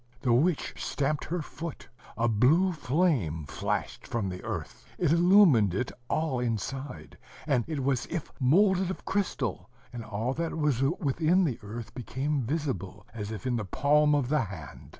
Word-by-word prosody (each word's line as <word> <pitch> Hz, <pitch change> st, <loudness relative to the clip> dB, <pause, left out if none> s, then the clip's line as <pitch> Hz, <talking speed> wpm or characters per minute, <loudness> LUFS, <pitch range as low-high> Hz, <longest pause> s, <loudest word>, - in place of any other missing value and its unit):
The 125 Hz, -3 st, +2 dB
witch 155 Hz, +6 st, +2 dB
stamped 145 Hz, +1 st, -1 dB
her 170 Hz, 0 st, -2 dB
foot: 165 Hz, +1 st, -7 dB, 0.3 s
a 120 Hz, -, +2 dB
blue 140 Hz, -, +4 dB
flame 135 Hz, -, 0 dB
flashed -, -, -3 dB
from 110 Hz, -5 st, -2 dB
the 90 Hz, 0 st, -6 dB
earth; -, -, -5 dB
it 170 Hz, -5 st, +2 dB
illumined 170 Hz, -, +6 dB
it 120 Hz, -, -1 dB, 0.2 s
all 155 Hz, -5 st, 0 dB
inside, 125 Hz, +4 st, -4 dB, 0.3 s
and 135 Hz, -6 st, +2 dB
it 150 Hz, -4 st, -3 dB
was 135 Hz, -1 st, 0 dB
as -, -, -8 dB
if 165 Hz, -, -4 dB
moulded 185 Hz, +7 st, +4 dB
of 190 Hz, -, -6 dB
crystal; 200 Hz, -1 st, -2 dB, 0.2 s
and 120 Hz, -2 st, -5 dB
all 110 Hz, +3 st, -2 dB
that 165 Hz, +2 st, -3 dB
was 150 Hz, -5 st, +1 dB
within 160 Hz, +4 st, +2 dB
the 135 Hz, -9 st, -1 dB
earth 110 Hz, +3 st, -7 dB
became 135 Hz, +4 st, -2 dB
visible, 130 Hz, -, -3 dB
as 105 Hz, -3 st, -5 dB
if 110 Hz, +3 st, -6 dB
in 125 Hz, -2 st, +1 dB
the 110 Hz, -, -2 dB
palm 150 Hz, +8 st, +3 dB
of 135 Hz, -4 st, 0 dB
the 150 Hz, -4 st, +2 dB
hand. 90 Hz, -7 st, -10 dB
135 Hz, 170 wpm, -28 LUFS, 115-160 Hz, 0.3 s, illumined